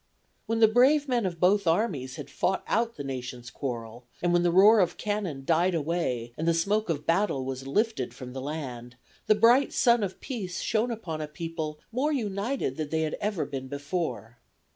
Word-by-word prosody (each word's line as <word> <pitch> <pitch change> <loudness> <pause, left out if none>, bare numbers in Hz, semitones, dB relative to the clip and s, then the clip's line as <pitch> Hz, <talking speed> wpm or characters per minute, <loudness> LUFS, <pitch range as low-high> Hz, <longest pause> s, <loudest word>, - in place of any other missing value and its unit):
"When 225 0 0
the 220 - +9
brave 265 +6 +4
men 240 -6 +1
of 170 -2 -6
both 195 +2 +3
armies 165 - 0
had - - -8
fought 190 - 0
out 230 +1 0
the 145 - -6
nation's 125 -2 -6
quarrel, 120 -2 -6 0.2
and 175 0 +2
when 175 - +4
the 175 - +3
roar 200 +5 +7
of 180 -3 +1
cannon 195 -10 -3
died 170 +3 +2
away 145 -7 -2
and 160 - -1
the 170 - +3
smoke 205 +5 +1
of 150 -2 -2
battle 165 -6 +1
was 135 0 -5
lifted 210 - 0
from 125 0 -9
the 130 - -5
land, 130 -5 -6 0.3
the 215 - +5
bright 235 +6 +5
sun 235 -2 +4
of 195 -2 -3
peace 200 -10 -5
shone 225 +2 0
upon 190 -9 -4
a 155 - -3
people 155 0 -5
more 265 +6 0
united 210 - -2
than 155 -2 -3
they 160 +1 0
had 155 -1 -1
ever 205 -4 -1
been 135 -2 -6
before. 140 -4 -4
170 Hz, 195 wpm, -27 LUFS, 135-215 Hz, 0.3 s, the